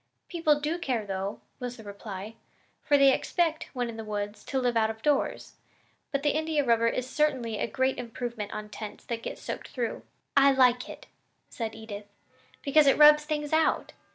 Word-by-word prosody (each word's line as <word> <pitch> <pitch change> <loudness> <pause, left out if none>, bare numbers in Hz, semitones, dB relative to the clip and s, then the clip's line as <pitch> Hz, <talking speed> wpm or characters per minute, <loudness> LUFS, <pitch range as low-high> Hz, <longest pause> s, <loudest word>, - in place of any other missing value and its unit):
"People 315 -4 +2
do 310 +4 -2
care, 250 -9 -1
though," 195 +1 -4 0.2
was 245 0 -5
the 225 - -11
reply, 200 0 -7 0.5
"for 290 - +3
they 275 -1 +6
expect, 325 0 0
when 245 -2 -1
in 230 -1 -7
the 225 - -5
woods, 205 0 -4
to 270 - -2
live 245 -2 0
out 220 -1 +3
of 220 0 -7
doors; 290 -2 0 0.5
but 280 -1 -1
the 295 - +3
India 310 -1 0
rubber 230 -1 +3
is 250 +2 -1
certainly 260 -7 0
a - - 0
great 260 +3 0
improvement 235 -3 -5
on 215 0 -5
tents 210 0 -8
that 230 -1 -4
get - - -5
soaked - - -6
through." 240 -3 -3 0.3
"I 275 0 +6
like 250 -2 +3
it," - - -10 0.5
said 225 -2 -4
Edith, 210 -2 -8 0.6
"because 290 0 +5
it 275 - +5
rubs 300 0 +8
things 300 -1 -2
out. 320 0 +2
245 Hz, 185 wpm, -28 LUFS, 220-290 Hz, 0.6 s, rubs